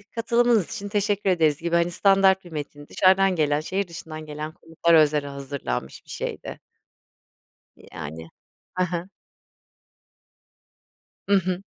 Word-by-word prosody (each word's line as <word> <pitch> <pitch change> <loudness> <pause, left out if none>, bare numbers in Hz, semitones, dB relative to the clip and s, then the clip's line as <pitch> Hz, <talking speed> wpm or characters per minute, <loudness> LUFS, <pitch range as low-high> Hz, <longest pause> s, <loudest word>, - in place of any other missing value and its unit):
katılımınız 235 -3 +2
için 200 0 -5
teşekkür 205 -1 0
ederiz 160 -5 +3
gibi, 170 0 0
hani, 170 +1 +2
standart 195 +1 +4
bir 175 - -12
metin 145 -1 -7
dışarıdan 190 0 +4
gelen 150 -2 +1
şehir 190 +4 -2
dışından 160 -2 -8
gelen 150 +1 -6
konuklara 165 -1 +3
özel 150 -1 +1
hazırlanmış 135 - -5
bir - - -22
şeydi. - - -5 1.2
Y - - -18
yani. 80 +3 -8 0.5
Hı 185 - +3
hı. 180 +1 -3 2.2
Hı 200 - +2
hı. 185 +1 -3
170 Hz, 125 wpm, -24 LUFS, 150-195 Hz, 2.2 s, standart